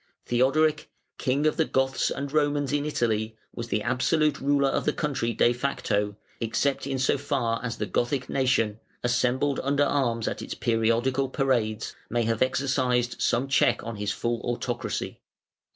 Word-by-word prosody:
Theodoric, 150 +5 +2 0.3
"King 140 +2 +1
of 155 - +2
the 160 - +3
Goths 135 -1 +1
and 140 0 -4
Romans 145 -2 +1
in 145 0 0
Italy", 110 -6 -1 0.2
was 115 -1 -6
absolute 130 +7 +1
ruler 140 0 +3
of - - -1
the 150 - +2
country 135 -6 -1
de 120 +2 +3
facto, 105 -5 -1 0.2
except 135 +5 0
in 135 -1 -1
so 130 +1 +1
far 115 -4 -1
as 120 -1 -3
the - - -2
Gothic 130 +1 -1
nation, 120 -5 +1 0.2
assembled 125 +3 +1
under 140 +1 +2
arms 120 -6 0
at - - -3
its - - -5
periodical 120 +4 +1
parades, 120 -6 0
may 120 0 +1
have 115 0 -1
exercised 130 -2 +1
some 125 +3 +1
check 135 - +2
on 115 -2 -5
his 105 0 -1
full 120 +4 -2
autocracy. 120 0 -3
130 Hz, 155 wpm, -26 LUFS, 115-140 Hz, 0.3 s, the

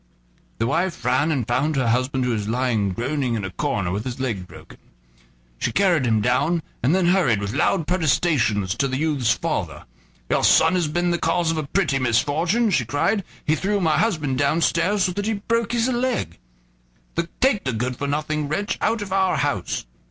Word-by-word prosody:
The 115 - 0
wife 170 +6 -1
ran 130 +6 +2
and 130 -7 -1
found 145 +6 0
her 130 -4 +1
husband 130 +2 0
who 125 - 0
was 105 -3 -2
lying 115 -3 0
groaning 125 +5 -2
in 105 -3 -3
a 95 - -5
corner, 105 -9 -2
with 100 +3 -2
his 130 +1 -5
leg 110 -9 -3
broken. - - -14 0.8
She - - -1
carried 170 - +2
him 110 -2 +2
down, 155 +9 +1 0.2
and 140 +8 +2
then 190 -2 +2
hurried 175 - +3
with 100 +1 -4
loud 160 +4 +1
protestations 145 - +1
to 125 +4 0
the 130 0 -2
youth's 145 -6 0
father. 120 - -1 0.4
"Your - - +1
son 165 +2 +5
has 175 -3 +1
been 175 +3 0
the 175 - 0
cause 170 -2 +1
of 165 - -3
a 155 -2 -3
pretty 155 -6 +1
misfortune," 160 - +1
she 140 - +2
cried; 145 - 0 0.2
"he 155 - +2
threw 200 +6 0
my 160 -4 +2
husband 155 - 0
downstairs 170 +6 +2
so 185 - +1
that 205 +3 -3
he 225 - +1
broke 230 +2 -1
his 235 0 +1
leg. 250 - -1 1.0
Take 250 -7 +2
the 130 - -1
good 125 +2 -2
for 140 - -4
nothing 150 +1 -2
wretch 200 +8 -2
out 225 -1 0
of 190 -2 -6
our 190 -4 +2
house." 145 - -2
150 Hz, 195 wpm, -22 LUFS, 125-180 Hz, 1.0 s, son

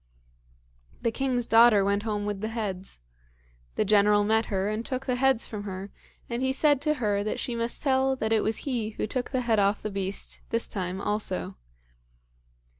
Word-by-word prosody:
The 230 - +1
king's 250 -1 0
daughter 225 -3 +6
went 200 +1 +1
home 210 -2 -2
with 205 -1 -3
the 215 - -2
heads. 195 - -5 0.7
The - - +1
General 205 0 +4
met 220 +2 +2
her, 195 -1 -1
and 215 +2 -2
took 255 +2 -4
the 255 - 0
heads 265 -2 +2
from 210 -2 -6
her, 195 0 -6 0.4
and 235 +1 -3
he 260 0 +1
said 285 0 +3
to 305 0 +1
her 205 -6 0
that 215 - -2
she 245 - -3
must 230 0 -1
tell 265 -1 +2
that 220 -3 -1
it 220 - +3
was 220 0 -1
he 230 -6 -2
who - - -1
took 245 +3 -3
the 255 -1 -1
head 230 -3 +2
off 200 +1 +1
the 215 - -3
beast 195 0 -3
this 230 0 +1
time 185 -1 -4
also. 195 - -1
220 Hz, 190 wpm, -27 LUFS, 200-245 Hz, 0.7 s, daughter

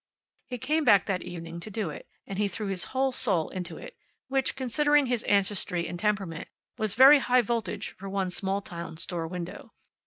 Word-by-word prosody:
He 250 - -4
came 305 +6 0
back 200 -8 +5
that 185 -3 -1
evening 170 -1 -7
to 195 - -8
do 205 -6 -3
it, - - -10 0.2
and 195 0 -5
he 210 - +2
threw 205 +3 -5
his 185 -2 -2
whole 265 0 0
soul 195 -10 +1
into 185 -2 -5
it, - - -10 0.3
which, 270 0 0
considering 290 +3 +3
his 245 -3 0
ancestry 190 -4 +1
and 175 +1 -6
temperament, 195 -5 -1 0.3
was 215 -2 -1
very 270 +4 +9
high 250 -1 +3
voltage 220 -2 -2
for 195 +1 -9
one 190 -2 -1
small 195 +2 -1
town 170 -3 -7
store 165 0 -4
window. 175 0 -7
200 Hz, 190 wpm, -28 LUFS, 180-245 Hz, 0.3 s, very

